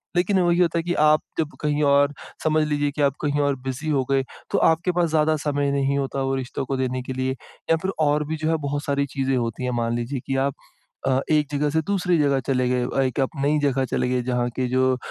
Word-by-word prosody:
लेकिन 190 +2 +2
वही 175 -1 +3
होता 170 -1 +2
है - - -2
कि 175 +1 -1
आप 155 0 +5 0.2
जब 155 -2 -2
कहीं 150 0 0
और 140 0 +4 0.3
समझ 155 0 +3
लीजिए 145 -1 0
कि 150 - -1
आप 140 -2 +3
कहीं 145 0 0
और 140 -1 +1
बिज़ी 135 +4 -4
हो 135 -3 +2
गए, 135 -1 +3 0.3
तो - - +2
आपके 165 +3 +3
पास 175 -2 +1
ज़्यादा 155 0 +2
समय 145 -1 0
नहीं 140 0 +1
होता 135 0 -2
वो 135 0 0
रिश्तों 130 0 -4
को 135 +1 -2
देने 130 0 -1
के 130 - -5
लिए 130 0 -1 0.4
या - - +6
फिर 190 - -1
और 150 0 +2
भी 160 - -2
जो 155 +1 -1
है 165 - +2
बहुत 145 +1 -2
सारी 140 0 +1
चीज़ें 135 -1 -1
होती 115 +1 -2
हैं। 125 - -1
मान 115 0 0
लीजिए 120 +3 -3
कि 135 - -1
आप 140 - -1 0.5
अ, 130 0 +3
एक 150 -1 +3
जगह 145 +1 0
से 160 +2 +1
दूसरे 180 -4 +1
जगह 140 -2 +2
चले 130 -2 +1
गए 125 -1 +1
और 135 - 0
एक 130 +1 -2
आप 135 - +2
नई 150 +2 +3
जगह 135 -2 +1
चले 125 - -1
गए 125 0 +1
जहाँ 125 -1 0
के 130 -1 0
जो 130 +1 +2
अ, - - -7
140 Hz, 260 wpm, -23 LUFS, 130-155 Hz, 0.5 s, या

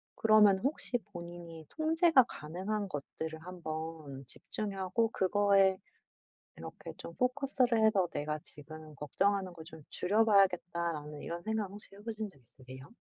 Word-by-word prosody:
그러면 210 -3 +6
혹시 260 -1 0 0.2
'본인이 170 -2 -8
통제가 320 -3 +4
가능한 190 +4 -4
것들을 160 +1 -5
한번 160 -5 -6
집중하고 200 - -2
그거에 195 0 +4 0.8
이렇게 - - -8
좀 170 - -9
포커스 270 +1 0
를 235 -2 +2
해서 195 -5 +4
내가 150 +1 -2
지금 155 0 -11
걱정하는 190 +6 0
거 165 -2 -10
좀 160 -1 -12
줄여봐야겠다.'라는 175 -7 +2
이런 170 +1 -5
생각 220 -1 -1
혹시 205 -1 -10
해 200 - -13
보신 220 -2 -4
적 - - -22
있으세요? 130 +2 -13
185 Hz, 315 characters per minute, -32 LUFS, 160-215 Hz, 0.8 s, 그러면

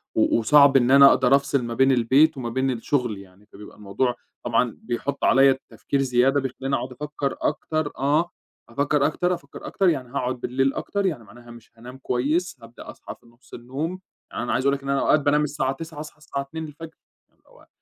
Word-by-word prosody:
و - - +2
وصعب 140 +4 +5
إن 125 0 +2
أنا 140 0 +8
أقدر 130 +1 +4
أفصل 140 -2 0
ما 120 0 -4
بين 135 +2 +3
البيت 135 +5 +3
وما 120 -2 -4
بين 130 +2 -1
الشغل 120 -2 -2
يعني، 100 +1 -16
فبيبقى 105 +1 -14
الموضوع 105 +5 -2 0.3
طبعًا - - 0
بيحُطّ 140 +4 -4
عليّا 135 0 +5
تفكير 140 -1 -2
زيادة 135 +2 +2
بيخلّيني 135 +1 -3
أقعد 130 - -4
أفكّر 145 +1 -4
أكتر 155 0 -2
آه، 150 +6 +1 0.4
أفكّر 140 +3 0
أكتر، 180 +4 0
أفكّر 140 -5 -9
أكتر، 190 -2 +1
يعني 130 -6 -2
هاقعد 125 -1 -3
بالليل 135 +3 0
أكتر، 200 -1 -3
يعني 145 -11 -2
معناها 120 +3 -15
مش 115 -1 -15
هانام 125 +3 -11
كويس، 145 +6 -1
هابدأ 115 +1 -13
أصحى - - -10
في - - -29
نُصّ 120 +2 -24
النوم، 145 +10 -5 0.3
يعني - - -4
أنا - - -2
عايز 130 - -1
أقول 140 0 +3
لِك 140 - -10
إن 140 - -6
أنا 140 - +1
أوقات 155 - +3
بانام 150 +1 +2
الساعة 140 -2 -1
21:00 160 +1 -9
أصحى 150 0 -9
الساعة 145 -2 -5
02:00 160 +2 -8 0.4
اللي - - -40
هو - - -21
135 Hz, 200 wpm, -23 LUFS, 125-150 Hz, 0.4 s, أنا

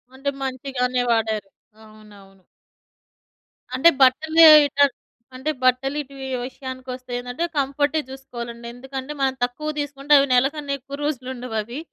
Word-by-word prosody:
అంటే 275 +1 -2
మంచిగానే 255 -1 -2
వాడారు. 220 -3 0 0.3
అవునవును. 205 -3 -17 1.3
అంటే 300 +6 +6
బట్టలే 315 +5 +6 0.2
ఎటన్ 285 -1 +2 0.4
అంటే 270 +4 -2
బట్టలు 255 +2 +2
ఇటు 275 0 -13
వీ 265 - -6 0.2
విషయానికి 260 -1 -9
ఒస్తే 255 -1 -13
ఏందంటే, 245 +7 -3
కంఫర్టే 285 +2 +1
జూసుకోవాలండి. 235 -3 -8
ఎందుకంటే, 265 +2 -7
మనం 265 -1 +1
తక్కువ 250 +5 -3
దీసుకుంటే 290 0 -1
అవి 275 - +2
నెలకన్నా 280 +3 +1
ఎక్కువ 275 +2 -9
రోజులు 260 -4 -3
ఉండవవి. 240 0 -5
260 Hz, 125 wpm, -22 LUFS, 245-280 Hz, 1.3 s, అంటే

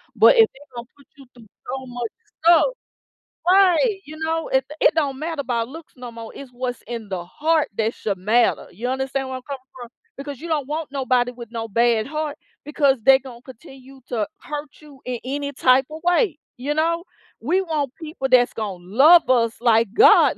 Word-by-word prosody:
But - - +7
if 450 -1 +6
they 270 - -18 0.2
done 235 0 -6
put 280 -2 -21
you 275 - -14
through 235 -3 -17 0.2
so 265 +1 -4
much 245 -2 -5 0.3
stuff 340 -1 +7 0.8
right, 385 +3 +4
you 310 +1 -10
know, 320 +1 -2
it 265 0 +1 0.2
it - - +4
don't 280 -4 0
matter 320 -1 -3
about 235 -3 -2
looks 320 +3 -12
no 245 -2 -9
more. 230 -1 -9
It's 275 -2 -10
what's 245 0 -5
in 230 -4 -6
the 180 -2 -4
heart 310 - 0
that 225 +1 0
should 200 -3 -3
matter, 220 +6 +1
you 230 +7 -5
understand 265 +1 -2
where 260 - -5
I'm 255 - -12
coming 275 -2 -6 0.2
from? 240 -1 -9 0.3
Because 280 -1 -7
you 335 - -8
don't 300 -5 -1
want 305 0 -4
nobody 255 -2 +1
with 235 -2 -11
no 230 -1 -4
bad 230 +1 +2
heart 305 0 -4 0.3
because 285 -2 +2
they 265 +2 +7
gone 250 -3 -12
continue 265 +1 -14
to 225 -4 -1
hurt 295 0 -6
you 285 -3 -16
in 250 -1 -4
any 285 +2 -3
typa 265 +3 +2
way, 355 -2 +2 0.2
you 275 +4 -2
know? 335 +2 0 0.4
We 350 +10 +1
want 300 -7 -2
people 305 -4 -4
that's 245 -1 +5
gonna 200 -5 -5
love 285 - +6
us 230 -3 +2
like 225 -3 +2
God - - +6
265 Hz, 195 wpm, -22 LUFS, 240-305 Hz, 0.8 s, But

